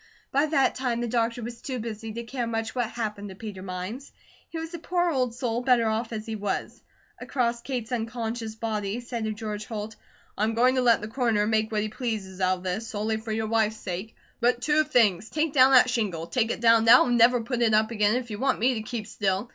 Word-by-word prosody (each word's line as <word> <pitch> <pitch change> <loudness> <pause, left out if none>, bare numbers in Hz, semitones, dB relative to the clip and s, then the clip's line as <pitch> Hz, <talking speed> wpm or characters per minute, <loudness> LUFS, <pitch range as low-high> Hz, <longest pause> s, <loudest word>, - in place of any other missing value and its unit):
By 285 +3 +2
that 285 -3 +2
time 250 -3 -2
the 240 - -1
doctor 235 0 0
was 235 +1 -7
too 260 -2 -4
busy 225 -1 -5
to 235 +1 -5
care 240 0 -3
much 225 -1 -3
what 245 -3 -1
happened 210 -4 -4
to 190 - -9
Peter 205 -2 -8
Mines; 185 +8 -6 0.4
he 330 - -6
was 325 +1 -6
a 340 - -5
poor 350 +1 0
old 255 -5 0
soul 240 -1 -1
better 250 -2 +3
off 220 +1 -1
as 215 -1 -5
he 225 -1 -4
was. 205 -1 -3 0.4
Across 235 -3 -1
Kate's 245 -2 -4
unconscious 225 -1 -3
body 215 -3 -2
he - - -3
said 235 -2 -4
to 220 - -1
George 210 -1 -5
Holt: 215 -1 -5 0.4
"I'm 220 +2 0
going 250 +2 +4
to 260 - +1
let 235 -3 +4
the 210 - -5
Coroner 225 -3 +1
make 220 0 +1
what 210 -1 0
he 215 - -3
pleases 210 -5 -4
out 185 0 +2
of 180 - -13
this, 195 +5 -3
solely 220 -1 -2
for 220 0 -6
your 220 0 -1
wife's 220 -1 +1
sake. 190 +4 -6 0.2
But 245 0 +1
two 305 +2 +3
things: 225 - +2
take 310 -1 -1
down 260 -2 +7
that 255 -1 +7
shingle. 205 -9 -1
Take 230 +4 0
it - - -3
down 230 -1 +5
now, 240 +3 +8
and 245 - +1
never 240 +1 +5
put 240 +1 -3
it 225 -2 +4
up 220 +1 +2
again 210 0 +2
if 245 -2 -3
you 210 - -5
want 265 -1 +1
me 250 +4 +2
to 220 - -3
keep 220 0 -5
still. 200 +1 -1
230 Hz, 240 wpm, -26 LUFS, 215-245 Hz, 0.4 s, now